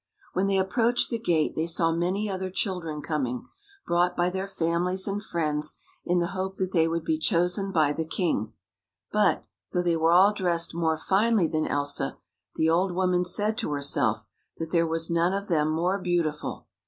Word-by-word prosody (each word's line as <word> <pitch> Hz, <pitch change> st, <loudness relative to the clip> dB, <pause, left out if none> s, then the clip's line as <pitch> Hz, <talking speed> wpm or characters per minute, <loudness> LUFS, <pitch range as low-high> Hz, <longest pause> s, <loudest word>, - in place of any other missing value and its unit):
When 190 Hz, +2 st, +1 dB
they 195 Hz, -1 st, +2 dB
approached 230 Hz, +5 st, +2 dB
the 230 Hz, -, -1 dB
gate, 165 Hz, -8 st, +1 dB
they 160 Hz, +1 st, -1 dB
saw 165 Hz, 0 st, +2 dB
many 180 Hz, +5 st, -1 dB
other 190 Hz, -1 st, -3 dB
children 180 Hz, -6 st, -3 dB
coming, 130 Hz, -6 st, -2 dB, 0.4 s
brought 175 Hz, +1 st, +1 dB
by 175 Hz, +1 st, +2 dB
their 190 Hz, +1 st, -3 dB
families 180 Hz, +1 st, -1 dB
and 205 Hz, +1 st, -2 dB
friends 150 Hz, -5 st, -1 dB, 0.3 s
in 180 Hz, -, +1 dB
the 175 Hz, 0 st, +1 dB
hope 190 Hz, 0 st, -3 dB
that 185 Hz, -1 st, -2 dB
they 165 Hz, -3 st, +3 dB
would 165 Hz, 0 st, -2 dB
be 315 Hz, 0 st, 0 dB
chosen 180 Hz, -, +1 dB
by 155 Hz, -5 st, +2 dB
the 160 Hz, -, -2 dB
king; 160 Hz, -, -1 dB, 0.6 s
but, 210 Hz, -1 st, +2 dB, 0.3 s
though 180 Hz, -1 st, +1 dB
they 170 Hz, -1 st, +2 dB
were 165 Hz, 0 st, +2 dB
all 190 Hz, +4 st, +6 dB
dressed 170 Hz, -4 st, 0 dB
more 160 Hz, -1 st, 0 dB
finely 200 Hz, +2 st, +2 dB
than 155 Hz, -1 st, -1 dB
Elsa, 145 Hz, 0 st, -1 dB, 0.4 s
the 160 Hz, -, +2 dB
old 175 Hz, +3 st, +2 dB
woman 180 Hz, -1 st, +2 dB
said 210 Hz, +5 st, 0 dB
to 185 Hz, -10 st, -2 dB
herself 120 Hz, -6 st, 0 dB, 0.3 s
that 165 Hz, 0 st, -5 dB
there 170 Hz, -1 st, +2 dB
was 165 Hz, +1 st, +1 dB
none 170 Hz, +2 st, +2 dB
of 200 Hz, +1 st, -3 dB
them 155 Hz, -3 st, +2 dB
more 175 Hz, +5 st, 0 dB
beautiful. 170 Hz, -5 st, -2 dB
175 Hz, 185 wpm, -26 LUFS, 160-190 Hz, 0.6 s, all